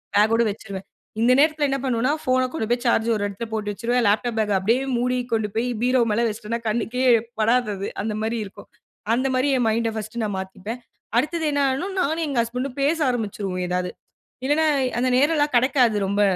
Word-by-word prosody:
Back 215 Hz, +2 st, +4 dB
ஓட 235 Hz, -, +3 dB
வச்சுருவேன். 195 Hz, -2 st, -8 dB, 0.4 s
இந்த 240 Hz, +2 st, +4 dB
நேரத்தில 305 Hz, 0 st, +3 dB
என்ன 275 Hz, -, 0 dB
பண்ணுவேன்னா, 255 Hz, +1 st, +1 dB
ஃபோன் 255 Hz, 0 st, +2 dB
கொண்டு 225 Hz, -9 st, -2 dB
போய் 240 Hz, 0 st, +1 dB
சார்ஜ் 230 Hz, -1 st, +2 dB
ஒரு 205 Hz, -, -2 dB
இடத்தில 205 Hz, +3 st, -6 dB
போட்டு 210 Hz, -2 st, -2 dB
வச்சுருவேன். 240 Hz, +4 st, 0 dB
லேப்டாப் 220 Hz, +3 st, +1 dB
பேக்‌ 215 Hz, -1 st, +1 dB
அ -, -, +3 dB
அப்பிடியே 230 Hz, +8 st, +1 dB
மூடி 250 Hz, +1 st, 0 dB
கொண்டு 220 Hz, -2 st, +1 dB
போய் 230 Hz, +2 st, 0 dB
பீரோ 255 Hz, +1 st, +3 dB
மேலே 230 Hz, +3 st, +1 dB
வச்சுட்டன்னா 220 Hz, +1 st, -4 dB
கண்ணுக்கே 235 Hz, +3 st, -1 dB, 0.4 s
படாது 235 Hz, +1 st, +2 dB
அது. 195 Hz, +1 st, -4 dB
அந்தமாரி 220 Hz, +2 st, -2 dB
இருக்கும். 200 Hz, +1 st, -13 dB, 0.5 s
அந்த 255 Hz, +3 st, +1 dB
மாதிரி 260 Hz, +3 st, +2 dB
என் 245 Hz, -, +1 dB
மைண்ட 225 Hz, +1 st, 0 dB
ஃபர்ஸ்ட் 220 Hz, +1 st, -6 dB
நான் 205 Hz, -2 st, -2 dB
மாத்தீப்பேன். 190 Hz, +5 st, -6 dB, 0.4 s
அடுத்தது 315 Hz, +6 st, 0 dB
என்ன 285 Hz, -1 st, +1 dB
ஆயிரும் 350 Hz, +9 st, -3 dB
நானும் 320 Hz, +1 st, 0 dB
எங்க 275 Hz, -4 st, -3 dB
ஹஸ்பண்ட் 250 Hz, +4 st, -3 dB
ம் 250 Hz, -, -22 dB
பேச 295 Hz, +4 st, +2 dB
ஆரம்பிச்சுருவோம் 200 Hz, -6 st, -3 dB
ஏதாவது. 180 Hz, 0 st, -1 dB, 0.5 s
இல்லன்னா, 295 Hz, +4 st, +2 dB, 0.3 s
அந்த 255 Hz, -, +2 dB
நேரம்லாம் 295 Hz, 0 st, +2 dB
கிடைக்காது 250 Hz, -3 st, +3 dB
ரொம்ப 200 Hz, +1 st, +1 dB
235 Hz, 190 wpm, -23 LUFS, 215-260 Hz, 0.5 s, பேக்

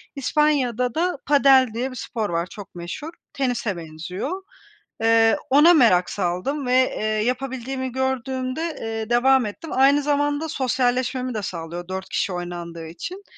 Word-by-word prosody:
İspanya'da 265 Hz, -4 st, +1 dB
da 350 Hz, -1 st, 0 dB
padel 275 Hz, -2 st, +5 dB
diye 255 Hz, +3 st, -2 dB
bir -, -, -9 dB
spor 225 Hz, -4 st, -3 dB
var, 170 Hz, +1 st, -1 dB
çok 205 Hz, -2 st, -11 dB
meşhur. 175 Hz, -, -6 dB, 0.2 s
Tenise 240 Hz, -7 st, -1 dB
benziyor. 180 Hz, -, -5 dB, 0.6 s
Eee, 225 Hz, 0 st, +5 dB
ona 300 Hz, +6 st, +7 dB
merak 185 Hz, -, +4 dB
saldım 200 Hz, +10 st, -2 dB
ve, 250 Hz, -, +1 dB, 0.2 s
eee, 215 Hz, -, -2 dB
yapabildiğimi 255 Hz, +3 st, -2 dB
gördüğümde, 265 Hz, +4 st, -2 dB
eee, 225 Hz, 0 st, -4 dB
devam 255 Hz, +1 st, +4 dB
ettim. 215 Hz, +10 st, -7 dB
Aynı 275 Hz, +2 st, +5 dB
zamanda 290 Hz, +2 st, 0 dB
sosyalleşmemi 255 Hz, -1 st, 0 dB
de 215 Hz, -, -3 dB
sağlıyor 175 Hz, -1 st, -6 dB
4 190 Hz, 0 st, -5 dB
kişi 190 Hz, -, -1 dB
oynandığı 175 Hz, -2 st, -6 dB
için 360 Hz, -, -7 dB
250 Hz, 140 wpm, -23 LUFS, 200-275 Hz, 0.6 s, ona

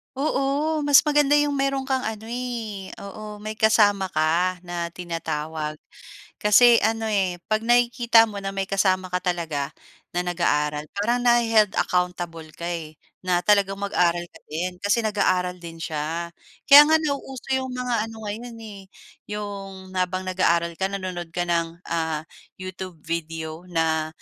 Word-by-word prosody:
Oo, 290 Hz, +2 st, 0 dB
mas 290 Hz, -1 st, +7 dB
maganda 295 Hz, -1 st, +3 dB
yung 290 Hz, -1 st, +1 dB
mayro'n 275 Hz, 0 st, -1 dB
kang 265 Hz, -1 st, 0 dB
ano 220 Hz, 0 st, -5 dB
eh, 230 Hz, -5 st, -5 dB
oo, 210 Hz, +1 st, -8 dB
may 215 Hz, +1 st, -6 dB
kasama 205 Hz, -4 st, +3 dB
ka 170 Hz, +4 st, +1 dB
na 175 Hz, -1 st, -5 dB
tinatawag. 160 Hz, -3 st, -4 dB, 0.6 s
Kasi 230 Hz, +3 st, +6 dB
ano, 225 Hz, +1 st, 0 dB
eh, 195 Hz, -5 st, 0 dB, 0.2 s
'pag 215 Hz, -, +3 dB
nakikita 240 Hz, 0 st, +4 dB
mo 205 Hz, -2 st, -6 dB
na 195 Hz, -, -4 dB
may 195 Hz, 0 st, -2 dB
kasama 185 Hz, -2 st, 0 dB
ka 180 Hz, -, 0 dB
talaga 165 Hz, -6 st, -2 dB, 0.4 s
na 180 Hz, 0 st, -2 dB
nag-aaral, 150 Hz, -4 st, 0 dB
parang 235 Hz, +5 st, +1 dB
nahe-held 230 Hz, -4 st, +3 dB
accountable 175 Hz, -3 st, -1 dB
ka 170 Hz, -, -7 dB
eh, 165 Hz, -3 st, -5 dB, 0.2 s
na 180 Hz, -1 st, 0 dB
talagang 200 Hz, -2 st, +3 dB
mag-aral 175 Hz, -4 st, +1 dB
ka 175 Hz, -, -17 dB
din 180 Hz, +3 st, -4 dB
kasi 210 Hz, +3 st, +1 dB
nag-aaral 180 Hz, -4 st, 0 dB
din 165 Hz, -1 st, -9 dB
siya. 165 Hz, +2 st, -4 dB, 0.3 s
Kaya 285 Hz, +1 st, +10 dB
nga 315 Hz, -, +6 dB
nauuso 280 Hz, -4 st, -3 dB
yung 260 Hz, 0 st, 0 dB
mga 245 Hz, -3 st, -2 dB
ano 220 Hz, -1 st, -10 dB
ngayon 230 Hz, +3 st, -6 dB
eh, 215 Hz, -3 st, -10 dB, 0.6 s
yung, 195 Hz, -2 st, -7 dB
habang 185 Hz, 0 st, -1 dB
nag-aaral 170 Hz, -2 st, +1 dB
ka, 190 Hz, -, +1 dB
nanonood 185 Hz, -3 st, -5 dB
ka 175 Hz, +2 st, -2 dB
ng, 170 Hz, -1 st, -1 dB, 0.2 s
ah, 160 Hz, -2 st, -1 dB, 0.3 s
YouTube 185 Hz, -1 st, -7 dB
video, 165 Hz, +1 st, -5 dB
na 160 Hz, -2 st, 0 dB
190 Hz, 150 wpm, -24 LUFS, 170-225 Hz, 0.6 s, Kaya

